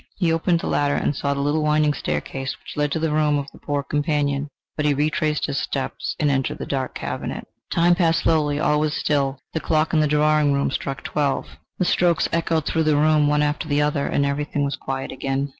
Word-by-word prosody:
He 170 -4 +2
opened 165 +1 +1
the - - -5
latter, 145 0 +1
and 145 - 0
saw 140 0 -1
the 140 - -2
little 145 +2 +1
winding 150 0 +2
staircase 130 - -3
which - - -11
led 150 0 0
to - - 0
the 160 -1 0
room 150 -1 +2
of 140 -1 -5
the - - -16
poor 145 -1 -2
companion... 145 -1 0 0.3
But 150 -1 0
he 145 - +3
retraced 150 +1 0
his 140 -1 -2
steps - - -3
and 145 -1 +2
entered 135 -1 -1
the - - -5
dark 130 -2 -3
cabinet. - - -5 0.2
The - - -4
time 170 +1 +5
passed 165 -2 +2
slowly. 150 -3 +2
All 150 -1 +2
was 155 0 0
still. 140 -2 0 0.2
The 160 - 0
clock 155 0 0
in 160 - +4
the 155 - +3
drawing 150 0 +3
room 140 -1 0
struck 135 -1 -4
twelve; 145 -2 -1 0.3
the 180 - +1
strokes 175 -1 +2
echoed 165 -2 +1
through 160 -1 0
the 155 -1 +3
room 150 0 +4
one 150 0 +2
after 150 +2 -1
the 145 0 +2
other, 145 -1 0
and 140 - +1
everything 145 0 -1
was 140 - -2
quiet 135 0 -4
again. 135 +1 -2
150 Hz, 225 wpm, -22 LUFS, 140-155 Hz, 0.3 s, time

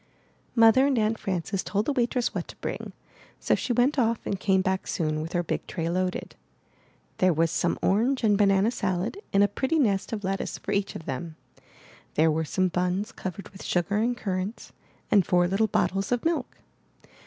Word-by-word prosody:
Mother 230 +4 +6
and 275 -3 +1
Aunt 220 0 +1
Frances 190 +1 -2
told 205 +1 -1
the 290 - 0
waitress 245 -1 0
what - - -3
to - - -11
bring; - - -5 0.5
so - - +1
she - - -1
went 250 +5 +2
off 230 -1 +2
and 195 - -2
came 190 -1 +2
back 190 -1 -1
soon 155 -3 -1
with 160 +2 -6
her 175 -1 +1
big - - -3
tray 165 -2 -3
loaded. 185 +1 -2 0.9
There 185 0 +4
was 165 0 +1
some 175 - 0
orange 240 +7 +2
and 210 -2 +4
banana 200 +1 +3
salad 195 - -2
in 200 0 +4
a - - +5
pretty 265 +10 -1
nest 205 -9 +1
of 215 -2 -4
lettuce 195 +1 -2
for - - -6
each 200 0 -1
of 160 - -7
them. 155 +4 -5 0.8
There 160 +1 +4
were 160 +1 0
some 185 +4 +1
buns 180 +3 -1
covered 190 +1 -7
with 190 - -13
sugar 175 +3 0
and 240 +3 +1
currants, 195 0 -4 0.4
and 200 - +6
four 175 0 +3
little 195 +4 +2
bottles 195 0 0
of 245 +2 0
milk. 330 -1 -1
195 Hz, 190 wpm, -26 LUFS, 180-225 Hz, 0.9 s, Mother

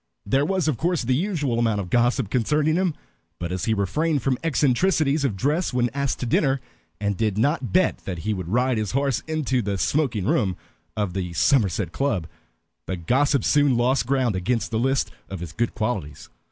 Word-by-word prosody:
There 135 +8 +2
was 185 -3 0
of 150 -6 +1
course 170 +1 0
the 130 +2 +1
usual 145 - 0
amount 115 -3 +1
of 90 -3 -5
gossip 120 -2 +2
concerning 150 +5 +2
him, 180 -3 +1 0.4
but 85 0 -4
as 90 -1 -2
he 110 - +1
refrained 140 - 0
from 130 -2 0
eccentricities 150 0 +2
of 130 -8 0
dress 150 - 0
when 120 -2 +1
asked 140 -1 -1
to - - -1
dinner, 135 +3 +2 0.4
and 100 -1 -1
did 105 -1 -1
not 135 +2 +1
bet 185 -1 +2
that 90 -4 -4
he 110 - +1
would 90 -4 -5
ride 125 +4 +1
his 105 0 -3
horse 135 -2 +1
into 150 -5 0
the 100 -2 -2
smoking 120 -4 0
room 100 -5 +1 0.4
of 100 -4 -1
the 90 -2 -3
Somerset 95 - +2
Club, 105 - -1 0.6
the 95 - -2
gossip 135 - +2
soon 145 -4 +3
lost 120 -1 +2
ground 130 -5 +1
against 105 +4 -1
the 110 - 0
list 135 +2 +1 0.2
of 95 - -5
his 85 -2 -6
good 115 +8 -2
qualities. 110 - -3
125 Hz, 195 wpm, -24 LUFS, 100-140 Hz, 0.6 s, soon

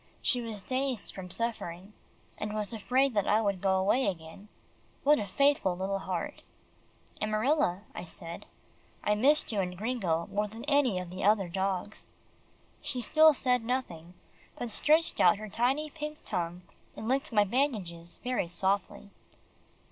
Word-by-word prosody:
She 245 - +2
was 220 -4 -6
dazed 260 -3 -2
from 185 -1 -8
suffering, 200 -3 -4 0.5
and 210 0 -3
was 210 +1 -2
afraid 250 +5 +2
that 205 -3 +1
I 210 - +4
would 200 -4 0
go 190 -1 +3
away 205 +7 +2
again. 175 +2 -5 0.6
What 295 +1 +5
a 205 - -3
faithful 275 -6 +2
little 195 +1 -1
heart! 185 -3 -4 0.8
"Amarilla," 215 - +1
I 175 - -6
said, 170 -1 -8 0.6
"I 210 - +3
missed 275 +8 +3
you 210 - -1
and 180 -1 -4
Gringo 195 -7 -1
more 210 +1 0
than 225 +3 -9
any 280 -9 +2
other 180 +1 -6
of 210 +2 +6
the 195 -3 -4
dogs." 190 +1 -2 0.7
She 290 -4 -2
still 310 +6 +6
said 250 -2 +1
nothing, 180 -9 -3 0.4
but 240 -2 -4
she - - -1
stretched 315 +2 +3
out 180 +3 +6
her 215 +1 -7
tiny 270 +8 0
pink 300 0 -7
tongue, 175 +1 -3 0.3
and 220 - -6
licked 270 +2 0
my 210 -2 +5
bandages 195 -8 -1
very 250 -8 0
softly. 195 +2 -1
210 Hz, 155 wpm, -30 LUFS, 185-255 Hz, 0.8 s, of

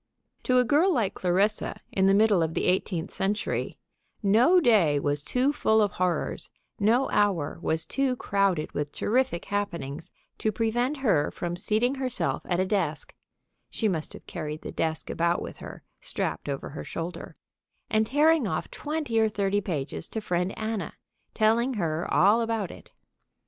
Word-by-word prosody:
To 255 - +3
a 250 - +6
girl 300 +9 +3
like 225 - +1
Clarissa, 195 +4 0
in 190 0 +2
the 195 - +5
middle 210 -3 +4
of 160 0 -1
the - - 0
eighteenth 180 -1 0
century, 205 +2 -1 0.5
no 235 - +5
day 200 - +4
was 145 0 -1
too 255 - +1
full 220 -5 +2
of 205 -3 +2
horrors, 180 -1 -1 0.3
no 230 +6 +3
hour 185 -8 +1
was 160 -1 0
too 270 -2 0
crowded 195 -8 0
with 145 0 -3
terrific 245 -6 0
happenings 170 -8 -3 0.3
to 215 - +1
prevent 240 +6 0
her 155 -10 +3
from 175 0 -4
seating 220 +7 +1
herself 260 -3 -2
at 175 -1 0
a 185 - +2
desk 180 -7 -1 0.6
(she 225 - -1
must 165 -6 -2
have - - -12
carried 155 -3 -6
the - - -5
desk 160 -1 -2
about 170 +1 +1
with - - -7
her, - - -10 0.2
strapped 80 - -3
over 140 -1 -4
her 150 - -7
shoulder) 170 +2 -6 0.5
and 220 0 +1
tearing 300 -1 +3
off - - -3
twenty 295 -6 -2
or 220 0 +3
thirty 205 -1 0
pages 160 -3 -4
to 220 - -3
Friend 180 -2 -1
Anna, 220 -1 -3 0.4
telling 235 +4 +2
her 165 -4 -2
all 210 +5 +5
about 225 -5 -1
it. - - -14
205 Hz, 165 wpm, -27 LUFS, 170-230 Hz, 0.6 s, a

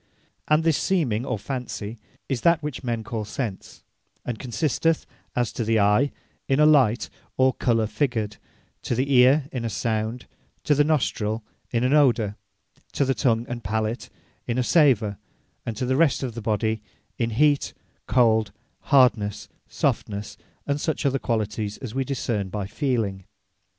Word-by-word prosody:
And 155 +1 +3
this 160 -3 +2
Seeming, 135 - 0
or - - -1
Fancy, 115 -2 -5 0.3
is 130 -4 -2
that 170 +1 +3
which 150 -3 -5
men 115 -2 -2
call 110 -1 -4
sense; 105 -1 -6 0.4
and 120 -3 -4
consisteth, 150 +7 0 0.3
as 120 -2 0
to 120 - -2
the 110 0 +2
Eye, 105 +8 +3 0.4
in 135 +1 +2
a 150 - +6
Light, 130 -7 +4 0.3
or 130 0 +4
Colour 115 -2 +1
Figured; 110 -4 -1 0.4
To - - -2
the 135 +3 0
Eare, 130 +3 +5
in 125 -3 -3
a 115 - -1
Sound; 110 +2 -2 0.4
To 150 - +3
the 145 +1 +4
Nostrill, 115 -8 0 0.3
in 115 0 0
an 130 +2 +2
Odour; 120 -8 +3 0.6
To 140 - +1
the 135 - +2
Tongue 120 -4 +1
and 120 -1 -5
Palat, 110 +3 -2 0.4
in 120 - -1
a 125 - +2
Savour; 120 - +3 0.5
and 115 - -3
to 130 - -1
the 130 +1 +1
rest 145 -2 +3
of 125 -3 -3
the 115 - -6
body, 110 0 0 0.4
in 115 -1 +1
Heat, 145 +5 +2 0.3
Cold, 110 -3 +3 0.4
Hardnesse, 120 -7 +3 0.2
Softnesse, 105 0 -2 0.3
and 145 0 -1
such 155 -3 -1
other 135 0 +2
qualities, 105 -2 -2
as 120 -4 -7
we 135 +1 0
discern 115 -7 -2
by 100 +1 -3
Feeling. 105 - -2
120 Hz, 160 wpm, -24 LUFS, 110-135 Hz, 0.6 s, a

